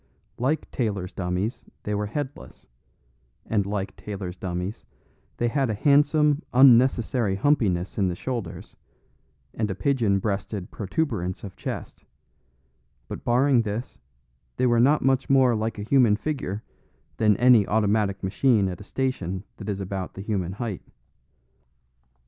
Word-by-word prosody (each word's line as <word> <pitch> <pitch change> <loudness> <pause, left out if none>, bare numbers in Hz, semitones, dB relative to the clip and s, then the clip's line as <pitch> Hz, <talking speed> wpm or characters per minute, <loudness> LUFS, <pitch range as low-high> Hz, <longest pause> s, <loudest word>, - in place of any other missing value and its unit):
Like 135 +6 -1
tailors' 100 -7 -2
dummies 90 +5 -3 0.2
they 105 - -2
were 105 0 -1
headless; 145 +5 -6 0.8
and 100 -3 0
like 100 -1 -3
tailors' 95 -4 -6
dummies 90 +3 -4 0.5
they 120 - +1
had 135 +1 0
a 110 - -1
handsome 150 +4 +3
unnecessary 125 -4 +5
humpiness 100 -7 +1
in 95 - +3
the 90 - -2
shoulders, 120 +3 -5 0.8
and 110 -1 -2
a 95 - -2
pigeon 110 -1 +1
breasted 100 -1 -3
protuberance 100 - -2
of 100 -3 -8
chest; - - -6 1.0
but - - -7
barring 125 +1 +3
this, 110 +2 -5 0.6
they 130 - +2
were 120 -1 +3
not 140 +5 +4
much 135 0 +2
more 130 -3 +5
like 110 0 -2
a 100 - -4
human 120 -2 +4
figure 110 -5 -4 0.5
than 105 -3 +3
any 120 -4 +5
automatic 105 -2 +1
machine 100 +2 +2
at 90 +1 -7
a - - -8
station 100 -7 -3
that 105 -1 -7
is 100 -1 -2
about 95 -1 -5
the 95 - -6
human 95 -4 -2
height. 110 -2 -4
110 Hz, 135 wpm, -25 LUFS, 95-130 Hz, 1.0 s, unnecessary